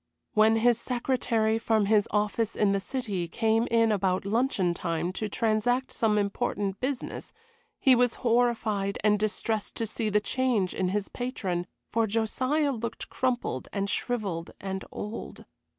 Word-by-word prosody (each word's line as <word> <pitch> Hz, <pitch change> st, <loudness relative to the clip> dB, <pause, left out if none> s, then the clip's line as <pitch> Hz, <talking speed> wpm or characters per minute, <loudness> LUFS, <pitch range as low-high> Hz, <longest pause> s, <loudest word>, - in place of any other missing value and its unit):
When 220 Hz, +1 st, +5 dB
his 235 Hz, +1 st, +3 dB
secretary, 235 Hz, -3 st, 0 dB
from 220 Hz, -2 st, +2 dB
his 210 Hz, 0 st, +3 dB
office 210 Hz, +1 st, 0 dB
in 205 Hz, -2 st, +3 dB
the 200 Hz, -, +1 dB
City, 200 Hz, -5 st, -3 dB
came 225 Hz, +5 st, +1 dB
in 230 Hz, -1 st, +3 dB
about 190 Hz, -2 st, +1 dB
luncheon 205 Hz, -5 st, +1 dB
time 170 Hz, 0 st, -2 dB
to 215 Hz, +2 st, -3 dB
transact 230 Hz, +4 st, +1 dB
some 215 Hz, -2 st, +1 dB
important 200 Hz, -1 st, -1 dB
business, 260 Hz, 0 st, -4 dB, 0.5 s
he 265 Hz, -, +6 dB
was 245 Hz, -1 st, +3 dB
horrified 225 Hz, -4 st, +1 dB
and 210 Hz, -1 st, +4 dB
distressed 215 Hz, 0 st, -1 dB
to 230 Hz, -, -1 dB
see 220 Hz, 0 st, -2 dB
the 210 Hz, 0 st, +3 dB
change 230 Hz, -4 st, 0 dB
in 185 Hz, -, 0 dB
his 200 Hz, +2 st, -1 dB
patron; 190 Hz, -8 st, -3 dB, 0.2 s
for 225 Hz, 0 st, +1 dB
Josiah 255 Hz, +7 st, +1 dB
looked 235 Hz, -3 st, -5 dB
crumpled 255 Hz, -1 st, -1 dB
and 200 Hz, 0 st, -2 dB
shrivelled 200 Hz, -9 st, -2 dB
and 190 Hz, -1 st, -4 dB
old. 210 Hz, +2 st, -7 dB
220 Hz, 150 wpm, -28 LUFS, 200-240 Hz, 0.5 s, he